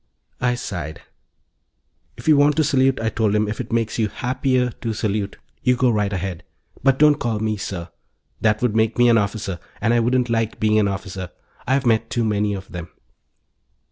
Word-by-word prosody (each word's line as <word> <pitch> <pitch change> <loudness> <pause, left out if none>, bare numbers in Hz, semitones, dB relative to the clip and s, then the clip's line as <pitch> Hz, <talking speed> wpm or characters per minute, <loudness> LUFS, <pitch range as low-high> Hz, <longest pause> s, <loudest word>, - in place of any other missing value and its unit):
I 125 0 +1
sighed. 85 -10 -6 1.1
"If - - -10
you 155 - +7
want 145 +1 +4
to 155 - +3
salute," 135 -2 +2
I 110 - 0
told 110 -2 +1
him, 105 0 +2
"if 105 - -3
it - - -8
makes 115 -1 0
you 110 - +2
happier 125 +2 0
to 115 0 -4
salute, 105 -2 -2 0.2
you 125 0 +3
go 125 0 +3
right 105 -2 0
ahead. 95 -2 -4 0.4
But 135 0 +3
don't 150 0 +5
call 115 -3 -1
me 110 0 0
'Sir.' 95 -4 -5 0.5
That 110 +1 +2
would 115 -3 +1
make 110 0 +2
me 120 0 +5
an 115 -1 +5
officer, 100 -3 -3 0.2
and 115 - +2
I 120 - +4
wouldn't 125 +1 +2
like 115 -1 -1
being 110 0 +3
an 105 - +3
officer. 95 -2 -5 0.4
I've 135 +1 +2
met 115 -1 +2
too 120 - 0
many 105 -1 0
of 95 0 -9
them." 90 -1 -7
110 Hz, 195 wpm, -22 LUFS, 105-125 Hz, 1.1 s, you